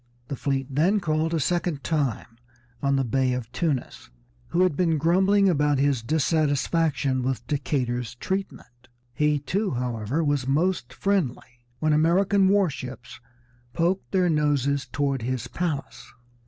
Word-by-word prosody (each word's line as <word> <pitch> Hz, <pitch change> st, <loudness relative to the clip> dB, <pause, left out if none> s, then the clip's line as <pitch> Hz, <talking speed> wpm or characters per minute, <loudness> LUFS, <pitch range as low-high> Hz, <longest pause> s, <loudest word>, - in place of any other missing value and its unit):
The 140 Hz, -, -2 dB
fleet 135 Hz, 0 st, -1 dB
then 160 Hz, +10 st, +2 dB
called 160 Hz, -2 st, 0 dB
a 165 Hz, -, 0 dB
second 170 Hz, -1 st, -1 dB
time 135 Hz, -7 st, -2 dB, 0.4 s
on 140 Hz, 0 st, +2 dB
the 135 Hz, -, +1 dB
Bey 130 Hz, +1 st, +1 dB
of 125 Hz, -2 st, -5 dB
Tunis, 130 Hz, -, -3 dB, 0.4 s
who 175 Hz, -, 0 dB
had 185 Hz, -5 st, +2 dB
been 165 Hz, -2 st, +2 dB
grumbling 190 Hz, +6 st, +3 dB
about 150 Hz, -5 st, +2 dB
his 140 Hz, -3 st, +1 dB
dissatisfaction 145 Hz, 0 st, +1 dB
with 130 Hz, 0 st, -2 dB
Decatur's 125 Hz, -5 st, -2 dB
treatment. 120 Hz, -8 st, -5 dB, 0.3 s
He 150 Hz, +4 st, +2 dB
too, 195 Hz, +9 st, -1 dB
however, 125 Hz, +3 st, -2 dB
was 145 Hz, -3 st, 0 dB
most 150 Hz, -2 st, 0 dB
friendly 135 Hz, -8 st, -2 dB, 0.2 s
when 155 Hz, +3 st, +1 dB
American 190 Hz, +5 st, +3 dB
war 200 Hz, -1 st, +4 dB
ships 130 Hz, -4 st, -8 dB, 0.5 s
poked 180 Hz, +3 st, 0 dB
their 185 Hz, -2 st, +2 dB
noses 140 Hz, -3 st, +1 dB
toward 135 Hz, +1 st, -1 dB
his 125 Hz, 0 st, -3 dB
palace. 160 Hz, -6 st, -4 dB
145 Hz, 140 wpm, -25 LUFS, 130-170 Hz, 0.5 s, war